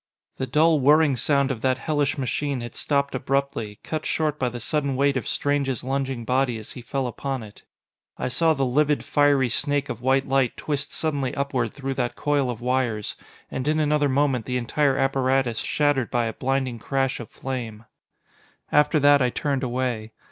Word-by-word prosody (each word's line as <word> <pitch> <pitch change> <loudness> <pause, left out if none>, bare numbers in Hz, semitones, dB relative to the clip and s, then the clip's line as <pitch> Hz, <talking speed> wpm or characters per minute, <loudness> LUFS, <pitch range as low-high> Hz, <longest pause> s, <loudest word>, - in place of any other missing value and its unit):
The 130 - -2
dull, 155 +4 +4
whirring 145 +1 +5
sound 140 +3 +1
of 120 -4 -4
that 130 +1 +2
hellish 145 +2 0
machine 135 0 -2
had 120 - -7
stopped 140 -1 0
abruptly, 130 -5 -2
cut 155 -1 -3
short 155 -2 -1
by 125 - +1
the 120 0 -7
sudden 140 +2 0
weight 140 +1 +2
of 125 -5 -2
Strange's 140 -3 0
lunging 135 -2 -2
body 125 -1 +1
as 110 - -8
he 125 - -8
fell 135 +3 -2
upon 130 +1 -4
it. 105 -1 -13 0.6
I - - -2
saw 160 +5 +2
the 135 -1 0
livid, 145 +3 +2
fiery 145 -3 +3
snake 145 +3 0
of - - -5
white 135 +2 +2
light 135 -2 +1
twist 145 -2 -2
suddenly 145 -5 -1
upward 130 -5 -1
through 135 -1 -4
that 125 -2 -2
coil 145 -3 0
of 120 -1 -5
wires: 120 -4 -1 0.4
and 130 +2 -3
in 155 +1 +2
another 150 -1 +2
moment 135 -4 +1
the 125 -1 0
entire 135 +3 +1
apparatus 135 -3 +1
shattered 145 -4 +1
by 120 -1 +1
a 110 - -3
blinding 130 -2 -1
crash 135 +2 -1
of 120 - -8
flame. 115 -4 -6 0.9
After 150 +1 +4
that 145 0 +6
I 125 - +3
turned 140 +1 -1
away. 120 -4 -2
135 Hz, 185 wpm, -24 LUFS, 125-145 Hz, 0.9 s, that